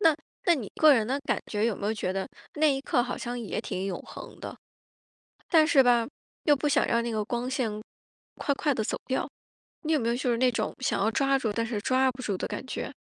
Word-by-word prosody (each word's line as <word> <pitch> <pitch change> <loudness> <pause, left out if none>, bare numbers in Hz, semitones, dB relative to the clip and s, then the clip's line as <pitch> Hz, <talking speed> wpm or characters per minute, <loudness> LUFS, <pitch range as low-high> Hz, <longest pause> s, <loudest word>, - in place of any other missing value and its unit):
那 325 -6 +5 0.3
那 345 - +5
你 235 -9 -5
个 305 -2 +7
人 225 -3 +2
的 270 +3 0
感 - - 0
觉， 210 0 0
有 230 - 0
没 205 - -4
有 220 - +1
觉 185 -4 -2
得 195 0 -3 0.3
那 310 +1 +3
一 270 - -2
刻 275 -3 +1
好 250 0 -4
像 245 0 -4
也 220 -2 -3
挺 190 -3 -4
永 185 - -3
恒 - - -10
的？ - - -7 1.0
但 315 -3 +6
是 275 -5 +6
吧， 240 -2 +4 0.4
又 295 -2 +6
不 295 +2 -1
想 290 0 +3
让 235 0 +2
那 235 - -2
个 215 -1 -1
光 240 +3 -3
线 255 -4 0 0.7
快 285 - 0
快 290 -1 +1
地 220 - -1
走 - - -2
掉。 260 - -1 0.6
你 315 - 0
有 300 - +3
没 230 - -1
有 235 - +1
就 250 0 0
是 230 - +1
那 255 0 +3
种 230 - -2
想 260 - 0
要 220 - +3
抓 275 +3 +2
住， 225 -5 -1
但 230 +2 0
是 220 -3 -3
抓 260 +2 +3
不 255 +1 -10
住 200 -6 -2
的 - - -3
感 - - -5
觉？ - - -4
245 Hz, 270 characters per minute, -28 LUFS, 220-275 Hz, 1.0 s, 个